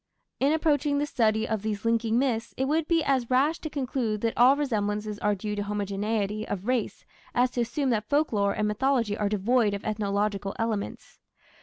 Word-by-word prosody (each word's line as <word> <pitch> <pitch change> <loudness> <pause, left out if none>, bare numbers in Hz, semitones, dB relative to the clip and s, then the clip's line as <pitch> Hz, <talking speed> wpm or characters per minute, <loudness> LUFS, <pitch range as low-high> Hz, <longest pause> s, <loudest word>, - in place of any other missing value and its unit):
In 275 +3 +3
approaching 300 -2 +1
the 290 - +1
study 220 -5 +1
of 220 -3 -1
these 215 0 -3
linking 230 0 +2
myths 240 -3 -1
it 265 - +1
would 310 +3 0
be 330 -2 +2
as 265 -4 +1
rash 280 +6 +2
to 315 - -5
conclude 250 -7 -2
that 230 -1 0
all 250 +4 +6
resemblances 210 -6 -2
are 210 0 +1
due 210 +2 -4
to 205 - -2
homogeneity 205 +1 -2
of 200 -1 -4
race 250 -3 -1 0.3
as 250 +1 +3
to 245 - -1
assume 265 +3 -1
that 215 -2 -1
folklore 215 -10 +2
and 210 - 0
mythology 230 0 +1
are 205 -1 -1
devoid 210 +1 +2
of 200 - -7
ethnological 205 -1 -1
elements. 225 -3 -4
225 Hz, 185 wpm, -27 LUFS, 210-265 Hz, 0.3 s, all